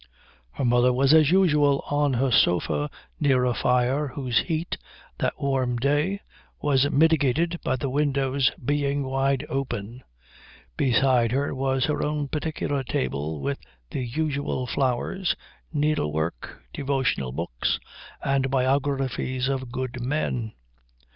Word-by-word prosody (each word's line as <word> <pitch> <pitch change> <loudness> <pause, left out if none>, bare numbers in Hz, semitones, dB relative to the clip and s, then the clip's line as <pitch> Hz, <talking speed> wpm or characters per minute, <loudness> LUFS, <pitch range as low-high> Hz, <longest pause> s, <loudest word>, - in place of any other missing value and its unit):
Her 135 - -2
mother 120 +1 +4
was 135 +3 +3
as 155 -2 +6
usual 150 -7 +4
on 145 -1 +1
her 130 +2 +1
sofa 75 -8 +2 0.3
near 130 -3 +3
a 125 - +2
fire 125 +5 +1
whose 125 -2 0
heat, 165 0 -2 0.4
that - - -1
warm 130 -3 0
day, 145 +10 +1 0.4
was 140 -1 +2
mitigated 160 +2 +2
by 130 - +1
the 130 +2 -3
windows 135 -1 +1 0.2
being 145 0 0
wide 135 0 0
open. 125 -3 -4 0.7
Beside 125 - +3
her 140 +2 0
was 135 -1 0
her 150 - -1
own 150 -1 -1
particular 150 -2 -2
table 80 - -2
with 70 0 -2 0.3
the - - -2
usual 140 0 -2
flowers, 135 +9 0 0.4
needlework, 85 - -1
devotional 135 - -1
books, 65 -4 -2 0.4
and 135 -1 +1
biographies 130 -1 0
of 130 -2 -2
good 130 0 -4
men. 125 -4 -2
135 Hz, 120 wpm, -25 LUFS, 125-145 Hz, 0.7 s, as